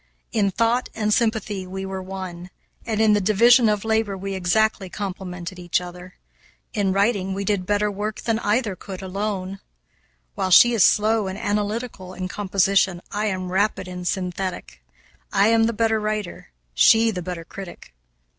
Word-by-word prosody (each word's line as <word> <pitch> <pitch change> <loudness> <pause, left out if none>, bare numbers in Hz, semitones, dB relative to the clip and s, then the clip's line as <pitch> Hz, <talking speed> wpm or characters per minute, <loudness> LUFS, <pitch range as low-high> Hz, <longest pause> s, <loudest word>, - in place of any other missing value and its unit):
In 205 -3 +2
thought 230 +5 0
and 215 -1 +1
sympathy 220 -5 0
we 190 +1 -5
were 190 0 -5
one, 185 -2 -7 0.4
and 220 -2 -1
in 220 -1 +5
the 205 - +2
division 230 +4 +5
of 210 0 -1
labor 220 -3 0
we 195 +1 -5
exactly 190 +1 +1
complemented 180 -2 -6
each 175 -1 0
other. 180 0 -10 0.6
In 200 -3 +1
writing 195 -1 +1
we 200 0 -3
did 195 -3 -1
better 205 0 +1
work 210 +2 -4
than 225 -1 0
either 210 -1 0
could 190 0 -9
alone. 195 0 -3 0.7
While 190 - -2
she 240 +6 +7
is 220 -5 +4
slow 215 -1 +3
and 190 +1 -5
analytical 205 -2 -3
in 185 0 -4
composition, 195 -2 +1
I 210 +1 -1
am 185 -2 -3
rapid 190 -1 0
and 180 -1 -6
synthetic. 185 - -4 0.5
I 200 +1 +4
am 225 0 +4
the 230 - +1
better 225 0 +1
writer, 215 -3 -4 0.2
she 225 - +5
the 180 -4 -4
better 175 -1 -5
critic. 185 - -10
200 Hz, 165 wpm, -23 LUFS, 185-215 Hz, 0.7 s, she